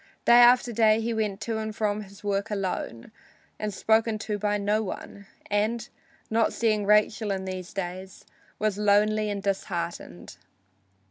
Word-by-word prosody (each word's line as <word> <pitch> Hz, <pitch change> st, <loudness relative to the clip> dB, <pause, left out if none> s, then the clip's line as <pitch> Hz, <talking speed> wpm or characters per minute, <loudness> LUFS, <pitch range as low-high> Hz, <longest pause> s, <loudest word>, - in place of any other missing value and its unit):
Day 235 Hz, 0 st, +7 dB
after 245 Hz, 0 st, +6 dB
day 220 Hz, 0 st, +4 dB
he 230 Hz, +1 st, -2 dB
went 210 Hz, -3 st, -2 dB
to 220 Hz, 0 st, -2 dB
and 215 Hz, -1 st, -5 dB
from 210 Hz, -1 st, -1 dB
his 200 Hz, -1 st, -13 dB
work 200 Hz, +1 st, -1 dB
alone 190 Hz, -, -4 dB, 0.5 s
and 210 Hz, 0 st, -2 dB
spoken 220 Hz, +2 st, +1 dB
to 210 Hz, 0 st, -4 dB
by 210 Hz, 0 st, 0 dB
none, 205 Hz, -1 st, -3 dB, 0.2 s
and, 215 Hz, +3 st, 0 dB, 0.4 s
not 225 Hz, 0 st, +1 dB
seeing 215 Hz, -3 st, 0 dB
Rachel 210 Hz, +1 st, +3 dB
in 190 Hz, -1 st, -2 dB
these 185 Hz, -1 st, -6 dB
days, 185 Hz, 0 st, -6 dB, 0.3 s
was 210 Hz, -1 st, -1 dB
lonely 210 Hz, +1 st, +3 dB
and 200 Hz, -1 st, -4 dB
disheartened. 175 Hz, -, -4 dB
210 Hz, 145 wpm, -26 LUFS, 195-220 Hz, 0.5 s, Day